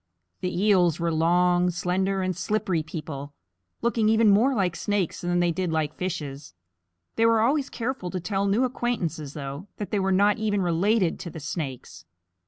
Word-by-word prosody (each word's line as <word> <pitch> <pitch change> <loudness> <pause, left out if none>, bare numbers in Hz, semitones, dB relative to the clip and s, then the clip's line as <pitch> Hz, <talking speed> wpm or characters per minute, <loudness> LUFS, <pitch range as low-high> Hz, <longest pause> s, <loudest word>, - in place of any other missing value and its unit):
The 180 -1 -2
Eels 180 -6 +4
were 170 -1 0
long, 175 +2 +3
slender, 190 +2 -1
and 185 -1 -1
slippery 185 -2 -1
people, 150 -3 -7 0.5
looking 230 -2 +2
even 220 -1 +5
more 245 +7 +4
like 185 -5 0
snakes 205 -3 -1
than 175 0 0
they 175 -1 +2
did 180 0 -2
like 155 -2 -1
fishes. 145 - -5 0.6
They 225 - +4
were 225 -1 +4
always 275 +4 +1
careful 240 -6 -3
to 185 - -3
tell 195 +2 -1
new 205 +6 +2
acquaintances, 180 - -2
though, 140 +5 -6
that 205 - -5
they 210 - +1
were 190 0 +1
not 205 +3 +3
even 205 -3 0
related 180 +2 +1
to 170 - -6
the 160 - -8
snakes. 145 -4 -6
185 Hz, 175 wpm, -25 LUFS, 165-210 Hz, 0.6 s, even